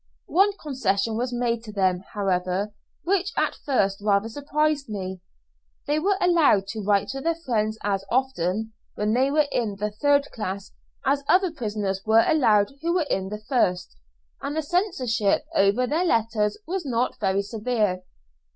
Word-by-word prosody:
One 395 +3 +5
concession 225 - -1
was 245 +2 -1
made 240 -1 -1
to 215 - -7
them, 190 -3 +1 0.2
however, 190 +1 -1 0.3
which 380 +1 +1
at - - +1
first 200 -8 0
rather 205 +1 +2
surprised 290 +1 -1
me. 190 -3 -5 0.6
They 295 +1 +1
were 390 +4 +1
allowed 330 - +4
to 220 0 -4
write 200 -1 +1
to 270 - -4
their 330 +3 0
friends 220 -9 -1
as 195 -1 0
often, 220 -4 0 0.2
when 210 +1 0
they 260 +3 +3
were 300 +1 +3
in 220 -5 -1
the 210 +1 -3
third 285 +6 +2
class, 200 -3 -5 0.3
as 280 +1 +2
other 370 -1 +4
prisoners 210 -8 -3
were 220 +1 +4
allowed 225 -9 +3
who 340 +2 0
were 345 -4 +2
in 190 0 -1
the 210 +1 -7
first, 180 - 0 0.5
and 290 - -3
the 315 - 0
censorship 265 - 0
over 200 +6 +3
their 310 +7 0
letters 225 -6 +1
was 370 +1 -3
not 250 -3 -1
very 195 -1 +1
severe. 210 -3 -1
225 Hz, 160 wpm, -25 LUFS, 200-285 Hz, 0.6 s, One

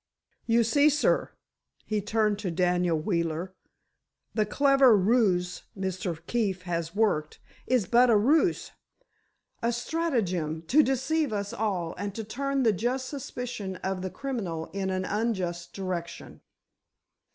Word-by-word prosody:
You 230 0 +4
see, 285 +6 +4
sir," 300 +1 +2 0.6
he 215 -1 -1
turned 210 0 +1
to 205 -3 -3
Daniel 175 -1 +1
Wheeler, 170 +1 -2 0.8
"the 215 -2 +1
clever 275 -2 +5
ruse 190 -4 +2 0.2
Mr. 185 -3 -3
Keefe 200 -5 -1
has 170 -1 -3
worked, 200 -8 0 0.3
is 250 -5 +2
but 240 +6 +4
a 225 - +6
ruse—a 305 - -2
stratagem, 225 - -1
to 270 - +5
deceive 280 +2 0
us 200 -1 -3
all 190 -6 -2
and 200 -1 -4
to 225 - -4
turn 275 +5 -1
the 225 -3 +4
just 250 +6 -2
suspicion 245 -8 -5
of 190 -1 -2
the 185 - -3
criminal 195 -12 -4
in 195 -1 -2
an 185 0 -1
unjust 190 -6 -2
direction." 180 -3 -5
205 Hz, 130 wpm, -27 LUFS, 180-245 Hz, 0.8 s, a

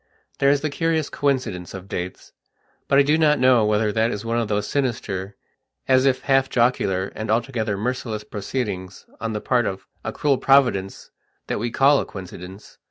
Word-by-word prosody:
There 140 - +4
is 140 0 +3
the 155 - -2
curious 160 -1 0
coincidence 115 - -1
of 95 0 -9
dates, 90 -1 -6 0.5
but 140 - +3
I 140 - +7
do 150 +3 +2
not 150 -2 +4
know 125 -3 +4
whether 105 0 +2
that 110 +1 +1
is 105 -1 -5
one 115 +1 0
of 115 - -1
those 105 0 -1
sinister, 105 -7 -2 0.5
as 130 0 +4
if 130 -1 +1
half 135 -1 +2
jocular 100 -6 +1
and 110 0 -5
altogether 115 -2 0
merciless 115 -1 -3
proceedings 100 -3 -5
on 115 -1 -3
the 105 - -3
part 120 -3 +1
of 95 -1 -5 0.2
a - - -3
cruel 140 -3 +1
Providence 120 -9 +2 0.3
that - - -2
we 120 +3 -1
call 135 +4 +4
a - - -2
coincidence. 95 +1 -10
115 Hz, 180 wpm, -22 LUFS, 100-135 Hz, 0.5 s, I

